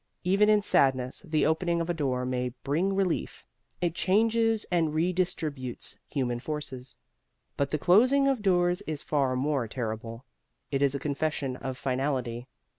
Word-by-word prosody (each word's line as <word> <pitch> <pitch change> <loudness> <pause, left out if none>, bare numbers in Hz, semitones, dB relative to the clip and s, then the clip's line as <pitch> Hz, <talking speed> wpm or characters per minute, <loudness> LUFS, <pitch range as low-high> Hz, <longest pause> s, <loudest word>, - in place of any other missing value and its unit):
Even 195 +4 +3
in 210 -1 +4
sadness, 130 -5 +2
the 155 -4 +1
opening 170 +2 +1
of 165 - -2
a 175 - 0
door 130 -6 -1
may 125 0 -1
bring 175 +8 0
relief: 190 -3 -1 0.4
it 175 -2 +1
changes 225 +4 +2
and 160 -3 +1
redistributes 160 -7 -2
human 120 -4 -1
forces. 135 -3 -6 0.6
But 140 -1 0
the 155 - 0
closing 250 - +4
of 270 -5 +1
doors 180 -1 +2
is 155 -2 -2
far 135 -4 +1
more 135 -2 0
terrible. 115 +1 -5 0.5
It 135 -1 0
is 140 -1 +2
a - - -2
confession 145 -2 -2
of 130 0 -5
finality. 130 -2 -2
150 Hz, 150 wpm, -28 LUFS, 130-180 Hz, 0.6 s, in